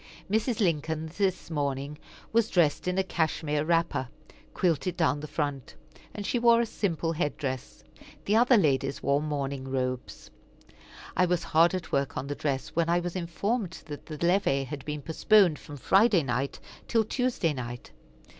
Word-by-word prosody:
Mrs. 220 Hz, +2 st, +1 dB
Lincoln 160 Hz, -4 st, 0 dB
this 190 Hz, -4 st, -1 dB
morning 140 Hz, -1 st, -2 dB, 0.3 s
was 230 Hz, -1 st, +3 dB
dressed 170 Hz, -2 st, +2 dB
in 180 Hz, +1 st, 0 dB
a 190 Hz, -, +3 dB
cashmere 155 Hz, -4 st, -1 dB
wrapper, 165 Hz, -5 st, +1 dB, 0.4 s
quilted 180 Hz, 0 st, 0 dB
down 160 Hz, -4 st, +2 dB
the 150 Hz, -, -6 dB
front; 145 Hz, -4 st, -3 dB, 0.4 s
and 205 Hz, -, -5 dB
she 240 Hz, -, 0 dB
wore 235 Hz, 0 st, +5 dB
a 235 Hz, -, +2 dB
simple 170 Hz, -7 st, -1 dB
head 150 Hz, -2 st, -1 dB
dress. 130 Hz, -4 st, -5 dB, 0.4 s
The 205 Hz, -, +2 dB
other 245 Hz, +2 st, +6 dB
ladies 135 Hz, -6 st, +1 dB
wore 140 Hz, +1 st, +2 dB
morning 140 Hz, -3 st, -3 dB
robes. 130 Hz, -1 st, -3 dB, 0.8 s
I 180 Hz, -, +3 dB
was 175 Hz, -1 st, 0 dB
hard 170 Hz, +3 st, +4 dB
at 180 Hz, -3 st, -5 dB
work 140 Hz, -1 st, 0 dB
on 130 Hz, -, -3 dB
the 145 Hz, -, -3 dB
dress, 140 Hz, -2 st, -2 dB
when 170 Hz, 0 st, 0 dB
I 175 Hz, +1 st, +3 dB
was 175 Hz, 0 st, -4 dB
informed 185 Hz, +3 st, -2 dB
that 145 Hz, -2 st, -9 dB
the 155 Hz, -, -6 dB
levee 170 Hz, -7 st, +2 dB
had 140 Hz, +1 st, -7 dB
been 150 Hz, -1 st, -4 dB
postponed 175 Hz, +1 st, +4 dB
from 145 Hz, -, -10 dB
Friday 195 Hz, -, +4 dB
night 135 Hz, +2 st, -2 dB, 0.3 s
till 225 Hz, -1 st, +3 dB
Tuesday 235 Hz, -, 0 dB
night. 120 Hz, -2 st, -7 dB
160 Hz, 165 wpm, -28 LUFS, 140-190 Hz, 0.8 s, other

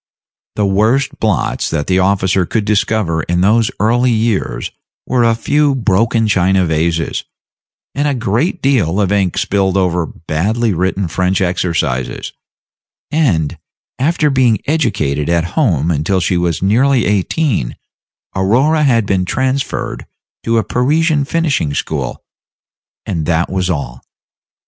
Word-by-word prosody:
The 105 Hz, -, +1 dB
worst 110 Hz, +8 st, +1 dB
blots 110 Hz, -4 st, 0 dB
that 75 Hz, -3 st, -2 dB
the 95 Hz, 0 st, +1 dB
officer 95 Hz, -1 st, +2 dB
could 110 Hz, -3 st, -1 dB
discover 105 Hz, -5 st, 0 dB
in 85 Hz, +2 st, -1 dB
those 110 Hz, +3 st, +3 dB
early 120 Hz, +4 st, +2 dB
years 110 Hz, -2 st, -1 dB, 0.3 s
were 125 Hz, -2 st, +1 dB
a 115 Hz, -1 st, +3 dB
few 145 Hz, +3 st, +1 dB
broken 115 Hz, 0 st, +1 dB
china 95 Hz, -2 st, +2 dB
vases, 80 Hz, +1 st, -1 dB, 0.7 s
and 145 Hz, +2 st, 0 dB
a 145 Hz, -, 0 dB
great 125 Hz, -, -1 dB
deal 105 Hz, -, +2 dB
of 100 Hz, -2 st, +1 dB
ink 100 Hz, -3 st, 0 dB
spilled 95 Hz, -1 st, +1 dB
over 90 Hz, -3 st, 0 dB
badly 100 Hz, +10 st, -1 dB
written 95 Hz, +2 st, -1 dB
French 90 Hz, +3 st, 0 dB
exercises; 85 Hz, -8 st, -2 dB, 0.8 s
and, 100 Hz, -, 0 dB, 0.4 s
after 150 Hz, +2 st, +1 dB
being 125 Hz, -5 st, +3 dB
educated 75 Hz, -, 0 dB
at 85 Hz, -1 st, +2 dB
home 85 Hz, -, +1 dB
until 85 Hz, +5 st, 0 dB
she 90 Hz, +1 st, 0 dB
was 85 Hz, -1 st, -1 dB
nearly 125 Hz, +6 st, +3 dB
eighteen, 105 Hz, -, 0 dB, 0.6 s
Aurora 130 Hz, +12 st, +2 dB
had 120 Hz, -7 st, +3 dB
been 95 Hz, -2 st, 0 dB
transferred 130 Hz, +8 st, -2 dB, 0.3 s
to 115 Hz, 0 st, 0 dB
a 110 Hz, -, +2 dB
Parisian 150 Hz, +5 st, +1 dB
finishing 140 Hz, -, 0 dB
school -, -, -3 dB, 0.8 s
and 80 Hz, -3 st, -3 dB
that 85 Hz, 0 st, 0 dB
was 95 Hz, -1 st, -1 dB
all. 70 Hz, -7 st, -4 dB
100 Hz, 130 wpm, -15 LUFS, 90-125 Hz, 0.8 s, those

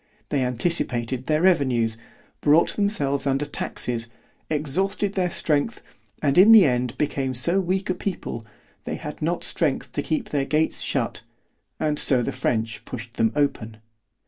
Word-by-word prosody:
——They 140 Hz, -3 st, +1 dB
anticipated 125 Hz, -2 st, -1 dB
their 155 Hz, +1 st, +1 dB
revenues——brought 135 Hz, 0 st, +1 dB
themselves 145 Hz, -10 st, 0 dB
under 135 Hz, +2 st, +1 dB
taxes, 120 Hz, -4 st, -3 dB, 0.4 s
exhausted 190 Hz, +7 st, 0 dB
their 185 Hz, -2 st, 0 dB
strength, 155 Hz, +6 st, -1 dB, 0.4 s
and 145 Hz, +3 st, +3 dB
in 205 Hz, +4 st, +8 dB
the 220 Hz, -5 st, +9 dB
end 125 Hz, -2 st, 0 dB
became 135 Hz, -3 st, -1 dB
so 170 Hz, +10 st, +2 dB
weak 190 Hz, +2 st, -1 dB
a 185 Hz, -, +1 dB
people, 180 Hz, -, -5 dB, 0.4 s
they -, -, -3 dB
had -, -, -8 dB
not 170 Hz, +3 st, -1 dB
strength -, -, 0 dB
to -, -, -2 dB
keep 270 Hz, -9 st, -2 dB
their 145 Hz, -2 st, +1 dB
gates 155 Hz, +2 st, 0 dB
shut, -, -, -1 dB, 0.6 s
and 150 Hz, -1 st, 0 dB
so 125 Hz, -3 st, +3 dB
the -, -, -2 dB
French 110 Hz, -2 st, -2 dB
pushed 115 Hz, -1 st, -8 dB
them 115 Hz, 0 st, +2 dB
open. 115 Hz, -7 st, -1 dB
145 Hz, 145 wpm, -24 LUFS, 125-175 Hz, 0.6 s, the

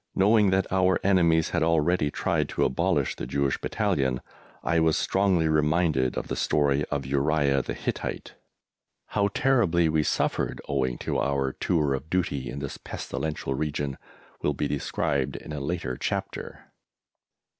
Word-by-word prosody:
Knowing 105 Hz, +1 st, +4 dB
that 95 Hz, 0 st, +2 dB
our 95 Hz, 0 st, +3 dB
enemies 85 Hz, -4 st, +3 dB
had -, -, 0 dB
already 80 Hz, 0 st, +2 dB
tried -, -, -1 dB
to -, -, +1 dB
abolish 80 Hz, -1 st, +1 dB
the -, -, -5 dB
Jewish 70 Hz, +1 st, 0 dB
Battalion, 65 Hz, -2 st, 0 dB, 0.4 s
I 80 Hz, -, +2 dB
was 80 Hz, -1 st, +3 dB
strongly 95 Hz, -4 st, +2 dB
reminded 75 Hz, -3 st, +2 dB
of -, -, -3 dB
the -, -, -3 dB
story 70 Hz, -1 st, +2 dB
of 70 Hz, -2 st, -3 dB
Uriah 70 Hz, 0 st, +2 dB
the -, -, -5 dB
Hittite! -, -, -4 dB, 0.8 s
How 100 Hz, -1 st, +1 dB
terribly 100 Hz, -8 st, +2 dB
we 80 Hz, 0 st, +2 dB
suffered -, -, -1 dB
owing 65 Hz, -3 st, 0 dB
to -, -, 0 dB
our 70 Hz, -1 st, 0 dB
tour 75 Hz, -5 st, +1 dB
of 70 Hz, +4 st, -5 dB
duty 80 Hz, -8 st, -1 dB
in 65 Hz, -, -6 dB
this 70 Hz, -1 st, -5 dB
pestilential 75 Hz, -3 st, -4 dB
region 70 Hz, -1 st, -2 dB, 0.4 s
will 75 Hz, -, 0 dB
be 75 Hz, -, -1 dB
described 70 Hz, -1 st, -1 dB
in 75 Hz, -, -7 dB
a 75 Hz, -, -3 dB
later 70 Hz, -3 st, -3 dB
chapter. -, -, -5 dB
75 Hz, 150 wpm, -26 LUFS, 70-85 Hz, 0.8 s, Knowing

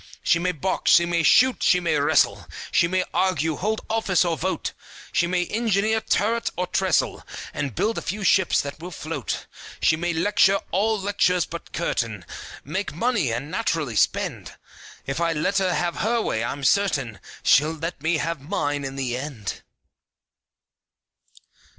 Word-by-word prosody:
She 170 Hz, -, +3 dB
may 180 Hz, +1 st, 0 dB
box, 180 Hz, +3 st, -1 dB
she 170 Hz, -, +6 dB
may 170 Hz, -1 st, +1 dB
shoot, 255 Hz, -, +4 dB
she 180 Hz, -, +4 dB
may 175 Hz, -2 st, 0 dB
wrestle, -, -, +2 dB, 0.2 s
She 170 Hz, -, +3 dB
may 185 Hz, +1 st, 0 dB
argue, 160 Hz, -4 st, +1 dB
hold 215 Hz, +3 st, -1 dB
office 220 Hz, -5 st, +1 dB
or 170 Hz, -1 st, 0 dB
vote, 185 Hz, +4 st, -2 dB, 0.4 s
She 170 Hz, -, +2 dB
may 180 Hz, 0 st, 0 dB
engineer 220 Hz, +1 st, +1 dB
turret 225 Hz, +2 st, 0 dB
or 180 Hz, -, 0 dB
trestle, 185 Hz, -1 st, 0 dB, 0.3 s
And 140 Hz, -7 st, -3 dB
build 225 Hz, +1 st, 0 dB
a -, -, -9 dB
few 205 Hz, +3 st, -4 dB
ships 190 Hz, -2 st, +3 dB
that 140 Hz, +1 st, -7 dB
will 175 Hz, +3 st, -7 dB
float. 155 Hz, -, -5 dB, 0.3 s
She 160 Hz, -, +3 dB
may 175 Hz, +2 st, -2 dB
lecture 195 Hz, +3 st, +3 dB
(all 215 Hz, +3 st, +1 dB
lectures 190 Hz, -3 st, +1 dB
but 170 Hz, -, -9 dB
curtain) 115 Hz, -, -2 dB, 0.4 s
Make 180 Hz, +3 st, -4 dB
money, 205 Hz, -, +1 dB
and 135 Hz, +7 st, -4 dB
naturally 160 Hz, -, -1 dB
spend, 100 Hz, -, 0 dB, 0.5 s
If 135 Hz, +4 st, -3 dB
I 165 Hz, -1 st, +2 dB
let 195 Hz, +6 st, +1 dB
her 185 Hz, -1 st, +1 dB
have 175 Hz, -1 st, -1 dB
her 230 Hz, +3 st, +1 dB
way, 110 Hz, -, -1 dB
I'm 140 Hz, +4 st, -4 dB
certain 135 Hz, -, +1 dB, 0.2 s
She'll 155 Hz, +4 st, +4 dB
let 165 Hz, -1 st, -5 dB
me 160 Hz, +2 st, +1 dB
have 165 Hz, -1 st, -3 dB
mine 145 Hz, -3 st, -2 dB
in 135 Hz, 0 st, -5 dB
the 130 Hz, -3 st, -2 dB
end! 130 Hz, -7 st, -5 dB
170 Hz, 160 wpm, -24 LUFS, 145-195 Hz, 0.5 s, she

